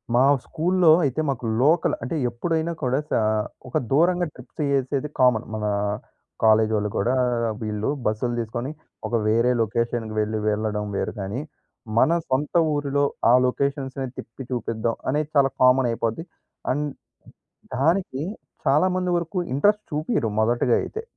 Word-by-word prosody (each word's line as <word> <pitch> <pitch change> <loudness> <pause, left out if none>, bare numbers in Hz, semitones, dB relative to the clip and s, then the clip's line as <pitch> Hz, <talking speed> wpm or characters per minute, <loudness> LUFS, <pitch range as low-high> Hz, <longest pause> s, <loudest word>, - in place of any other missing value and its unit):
మా 125 - +5 0.2
స్కూల్‌లో 175 0 +3
అయితే 140 +4 0
మాకు 125 -3 -3 0.2
లోకల్, 160 +5 +3
అంటే 165 - -3
ఎప్పుడైనా 160 +7 -1
కూడా 130 +2 +1
సా - - +3 0.5
ఒక - - 0
దూరంగా 175 +4 +3
ట్రిప్స్ - - -15
చేసేది 140 +1 0
కామన్. 125 -3 +4
మన 105 -1 -3 0.8
కాలేజ్ 110 0 +5
ఒళ్ళు 105 0 -1
కూడా, 125 +6 +1 0.5
వీళ్ళు 105 +2 -2 0.2
బస్సులు 110 +3 0
తీసుకొని, 120 +5 -3 0.4
ఒక 120 - -1
వేరే 115 +3 +3
లొకేషన్‌కి 115 0 -1
వెళ్ళి 110 0 -1
వెళ్ళడం 105 0 -1
వేరు - - -2
కానీ. 100 +8 -3 0.6
మన 160 - +5 0.2
సొంత 135 +3 0 0.2
ఊరిలో 145 -1 0 0.3
ఆ - - +6
లొకేషన్స్‌ని 135 0 -2
తిప్పి 125 +4 -8
చూపిద్దాం 115 -2 -1
అనేది 150 +2 0
చాలా 135 -1 +4
కామన్‌ 125 -1 +5
అయిపోద్ది. 115 +8 -2 0.5
అండ్, 145 +2 0 0.9
దానికి 155 -1 +1 0.4
చాలా 150 +7 +4
మంది 180 -1 0
వరకు 170 +2 -4 0.2
ఇంట్రెస్ట్ 210 +8 +3
చూపియ్యరు 150 - 0
మొదటిగా 120 +2 +2
అయితే. 445 - -5
130 Hz, 135 wpm, -24 LUFS, 115-150 Hz, 0.9 s, ఆ